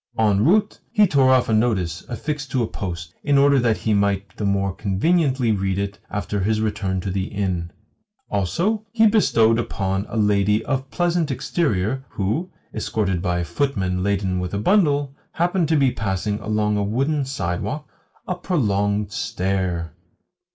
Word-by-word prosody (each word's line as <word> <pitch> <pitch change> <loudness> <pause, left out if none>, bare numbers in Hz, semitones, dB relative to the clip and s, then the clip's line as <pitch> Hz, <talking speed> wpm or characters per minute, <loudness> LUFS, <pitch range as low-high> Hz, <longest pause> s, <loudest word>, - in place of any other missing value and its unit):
En 105 -2 +3
route 205 - +2
he 210 - +5
tore 135 -6 +4
off 130 -1 +4
a 110 - +1
notice 100 -7 +1
affixed 140 +3 -4
to 130 -2 0
a - - -1
post, 85 -5 -6
in 145 -1 +3
order 140 0 +5
that 115 -3 +2
he 110 - 0
might 100 -1 0
the 105 - -3
more 100 -1 +1
conveniently 130 - +1
read 95 -2 0
it 100 0 -3
after 105 0 -3
his 110 +3 +1
return 100 -3 -1
to 95 - -3
the 95 0 -1
inn. 95 -4 -2 0.6
Also, 170 - 0
he 225 -1 +4
bestowed 115 - +4
upon 95 -3 -2
a - - -4
lady 105 0 +2
of 135 -1 -2
pleasant 175 -3 0
exterior 130 - -1
who, 110 - -2 0.2
escorted 100 -4 -1
by 90 -2 0
a 85 - -1
footman 95 - -1
laden 95 -1 0
with 90 +2 -3
a - - 0
bundle, 145 - +2 0.2
happened 175 0 +1
to 160 - +3
be 135 -3 +3
passing 105 0 -2
along 105 -1 0
a 100 - +1
wooden 135 +8 0
sidewalk 130 - -3 0.4
a 180 - 0
prolonged 105 - 0
stare. 90 -4 -2
105 Hz, 165 wpm, -22 LUFS, 95-140 Hz, 0.6 s, he